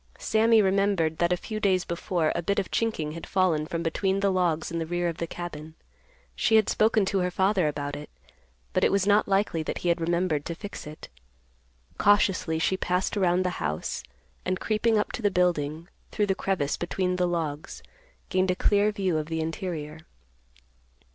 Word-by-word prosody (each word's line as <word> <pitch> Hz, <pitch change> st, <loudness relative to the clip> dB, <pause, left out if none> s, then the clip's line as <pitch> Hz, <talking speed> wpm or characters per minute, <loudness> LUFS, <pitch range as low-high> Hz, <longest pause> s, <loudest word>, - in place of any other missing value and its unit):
Sammy 220 Hz, 0 st, +3 dB
remembered 190 Hz, -5 st, +1 dB
that 170 Hz, 0 st, +2 dB
a 180 Hz, -, +2 dB
few 215 Hz, +4 st, -5 dB
days 190 Hz, -4 st, +2 dB
before 170 Hz, -1 st, -1 dB
a -, -, -2 dB
bit 200 Hz, +4 st, -1 dB
of 200 Hz, -, -1 dB
chinking 215 Hz, -10 st, -1 dB
had 165 Hz, +1 st, -8 dB
fallen 170 Hz, -5 st, +1 dB
from 170 Hz, 0 st, -3 dB
between 190 Hz, +4 st, 0 dB
the 200 Hz, 0 st, +2 dB
logs 175 Hz, -4 st, 0 dB
in 170 Hz, -, -2 dB
the 165 Hz, -, -2 dB
rear 175 Hz, +1 st, -1 dB
of 165 Hz, -2 st, -3 dB
the 170 Hz, -, -2 dB
cabin. 160 Hz, -2 st, -7 dB, 0.6 s
She 220 Hz, -, +2 dB
had 220 Hz, -2 st, +4 dB
spoken 215 Hz, -1 st, +3 dB
to 195 Hz, 0 st, 0 dB
her 180 Hz, 0 st, +1 dB
father 190 Hz, -1 st, +2 dB
about 145 Hz, -1 st, -3 dB
it, 150 Hz, -, -8 dB, 0.6 s
but -, -, +1 dB
it -, -, +4 dB
was 195 Hz, -1 st, +2 dB
not 205 Hz, +1 st, +4 dB
likely 195 Hz, -4 st, +1 dB
that 155 Hz, -, -3 dB
he 175 Hz, -, -1 dB
had 170 Hz, 0 st, +1 dB
remembered 170 Hz, -3 st, 0 dB
to 170 Hz, -, -4 dB
fix 205 Hz, -3 st, -8 dB
it. 155 Hz, +1 st, -10 dB, 0.9 s
Cautiously 195 Hz, -5 st, +3 dB
she 185 Hz, +4 st, +1 dB
passed 180 Hz, +2 st, -1 dB
around 185 Hz, -2 st, +2 dB
the 180 Hz, -, +1 dB
house, 75 Hz, 0 st, -2 dB, 0.4 s
and, 185 Hz, 0 st, -1 dB
creeping 220 Hz, +1 st, +1 dB
up 210 Hz, -, 0 dB
to -, -, -5 dB
the 205 Hz, -, +3 dB
building, 170 Hz, -3 st, 0 dB, 0.2 s
through 210 Hz, -, 0 dB
the 195 Hz, -, +1 dB
crevice 185 Hz, -7 st, -1 dB
between 180 Hz, +1 st, -1 dB
the 180 Hz, -1 st, +2 dB
logs, 160 Hz, -4 st, -4 dB, 0.5 s
gained 185 Hz, -1 st, +1 dB
a 185 Hz, -, +2 dB
clear 205 Hz, +2 st, +3 dB
view 190 Hz, -6 st, 0 dB
of 155 Hz, -, -5 dB
the 160 Hz, 0 st, -3 dB
interior. 160 Hz, -1 st, -4 dB
180 Hz, 195 wpm, -27 LUFS, 160-195 Hz, 0.9 s, had